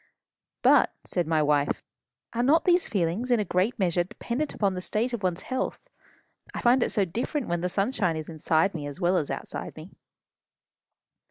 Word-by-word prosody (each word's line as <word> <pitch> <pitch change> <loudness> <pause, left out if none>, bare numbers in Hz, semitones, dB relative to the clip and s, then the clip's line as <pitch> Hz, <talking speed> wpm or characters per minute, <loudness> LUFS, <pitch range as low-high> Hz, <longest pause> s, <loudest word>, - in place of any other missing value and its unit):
"But," - - +5
said 175 -3 -2
my 160 -1 +2
wife, 145 -1 +1 0.5
"are 235 - 0
not 295 +7 +3
these 355 -1 +4
feelings 195 +5 -1
in 240 -2 +3
a 210 - 0
great 185 +7 0
measure 175 -3 +1
dependent 240 - -4
upon 200 -3 +1
the 180 - -4
state 230 +6 -1
of 235 - -3
one's 180 -2 -1
health? 260 - -3 0.7
I - - -2
find 245 +2 +4
it - - +2
so 205 -3 +2
different 240 - -3
when 170 0 -1
the 180 - -1
sunshine 195 -4 0
is 155 - -5
inside 160 +3 +1
me 150 -4 -5
as 145 +4 -8
well 180 0 +2
as 155 -5 0
outside - - -5
me." - - -10
190 Hz, 185 wpm, -27 LUFS, 170-240 Hz, 0.7 s, But